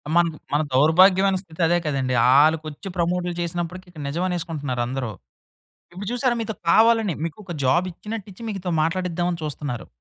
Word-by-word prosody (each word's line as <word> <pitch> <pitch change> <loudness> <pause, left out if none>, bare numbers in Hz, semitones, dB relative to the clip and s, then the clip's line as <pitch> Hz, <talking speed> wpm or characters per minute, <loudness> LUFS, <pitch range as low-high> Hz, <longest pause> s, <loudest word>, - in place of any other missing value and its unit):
మన, 175 0 +5 0.3
మన 150 - +3
దౌర్భాగ్యమైన 185 +7 +5
స్థితి 170 -2 -9
అదే 175 +1 +3
కదండీ! 135 -3 -1 0.2
ఆళ్ళకొచ్చి 155 +4 +2
ప్రమోట్లు 175 +1 0
చేసినప్పటికి 175 +2 -4
ఇక్కడ 155 -4 -9
నిజమనేసుకుంటున్నారు 160 -6 -2
అందరూ. 125 -3 -3 0.8
ఇప్పుడు 190 +2 -7
చూసారా 245 -1 +1
మీతో 220 -1 -4
కావాలని 225 -3 +4
మీకు 165 +2 -4
ఒక 175 - -6
జాబిచ్చినట్టిచ్చి 185 - -2
మీతో 190 -3 -4
మాట్లాడిద్దామని 175 0 -1
చూస్తున్నారు. 145 -5 -5
175 Hz, 130 wpm, -23 LUFS, 155-185 Hz, 0.8 s, మన